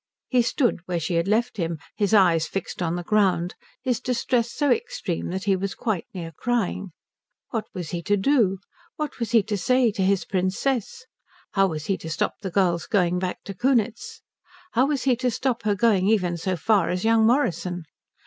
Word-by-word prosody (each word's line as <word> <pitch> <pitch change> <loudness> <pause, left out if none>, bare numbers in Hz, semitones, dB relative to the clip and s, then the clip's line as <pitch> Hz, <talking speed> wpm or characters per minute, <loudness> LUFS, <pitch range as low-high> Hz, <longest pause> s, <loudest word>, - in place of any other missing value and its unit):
He 250 -2 +4
stood 240 -1 +1
where 175 -2 -1
she 175 +3 -2
had 170 +2 +1
left 230 +3 +1
him, 165 -3 -2 0.2
his 205 -1 0
eyes 170 -6 +4
fixed 195 0 -5
on 170 -1 0
the 175 - -4
ground, 190 -3 +2 0.3
his 250 -3 0
distress 245 -1 0
so 290 -3 +1
extreme 185 -6 -2
that 190 +2 -3
he 200 -2 +2
was 190 0 -3
quite 210 -7 -2
near 170 -3 -6
crying. 205 0 -2 0.6
What 225 -3 -2
was 175 -4 -5
he 175 - -3
to 205 +4 +1
do? 205 -3 +3 0.4
What 305 -3 -4
was 230 - -2
he 230 -3 +4
to 210 +1 -2
say 255 +2 +3
to 200 - -3
his 190 0 +2
Princess? 195 +7 -1 0.5
How 195 -1 +3
was 155 -4 -4
he 195 - -1
to 160 - -7
stop 155 - -1
the 195 - -3
girl's 175 -2 +1
going 180 -4 +2
back 185 0 -4
to 200 - -6
Kunitz? 240 +1 0 0.5
How 260 -3 +3
was 280 -4 -1
he 260 -2 +3
to 250 0 0
stop 245 +1 -1
her 205 -1 +2
going 200 -3 +3
even 185 -5 +2
so 185 +2 -2
far 205 -3 +2
as 180 +3 -1
young 225 -1 +4
Morrison? 180 - 0
200 Hz, 195 wpm, -24 LUFS, 180-235 Hz, 0.6 s, He